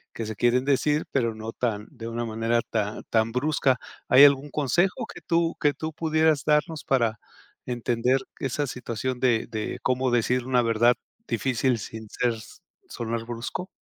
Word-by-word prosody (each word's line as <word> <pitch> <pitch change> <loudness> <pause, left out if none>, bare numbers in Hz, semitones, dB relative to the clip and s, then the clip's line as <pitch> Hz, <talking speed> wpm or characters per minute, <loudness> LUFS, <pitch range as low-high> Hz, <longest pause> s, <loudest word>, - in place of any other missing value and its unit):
que 115 - -4
se 110 0 -5
quieren 120 +3 +2
decir, 145 +2 +2
pero 115 -4 0
no 110 +1 -6
tan 110 -3 -2
de 115 -5 -8
una 120 +1 -3
manera 115 +1 0
tan 105 -1 -3
tan 110 0 +2
brusca, 130 0 +1 0.3
¿hay 135 +3 +8
algún 140 +1 +3
consejo 175 - +1
que - - -11
tú 165 0 +1
que 145 -1 +3
tú 160 0 -5
pudieras 155 -2 +2
darnos 150 0 +1
para 115 -5 +1 0.5
entender 125 +1 +1 0.2
esa 135 +2 -1
situación 125 0 -4
de 120 -3 +2
de 110 -1 -4
cómo 130 +1 +1
decir 120 +1 +1
una 125 -1 +3
verdad 115 +1 +4 0.3
difícil 130 -1 +1
sin 110 +1 -8
ser 120 +2 0 0.6
sonar 115 0 -4
brusco? 120 +10 -5
125 Hz, 160 wpm, -26 LUFS, 115-140 Hz, 0.6 s, hay